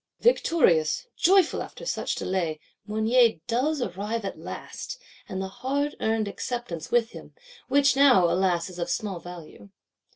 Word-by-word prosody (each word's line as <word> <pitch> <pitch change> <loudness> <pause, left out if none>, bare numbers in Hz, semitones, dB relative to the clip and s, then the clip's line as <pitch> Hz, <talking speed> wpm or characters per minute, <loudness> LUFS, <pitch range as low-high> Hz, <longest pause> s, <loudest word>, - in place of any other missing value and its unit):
Victorious, 285 - +3
joyful 375 -1 +4
after - - -9
such - - -2
delay, 170 -5 -2 0.3
Mounier 220 +2 +3
does 265 +4 0
arrive 205 +3 -3
at 195 - -5
last, - - -7 0.3
and 190 -2 -4
the 190 - -3
hard 280 +8 -2
earned 220 -1 0
Acceptance 200 -6 -5
with 240 -1 +2
him; - - -12 0.3
which 280 -1 +4
now, 265 -10 +6
alas, 175 -1 +1
is 180 -2 -10
of 170 - -2
small 200 -5 -2
value. 170 - -11
220 Hz, 140 wpm, -26 LUFS, 180-265 Hz, 0.3 s, now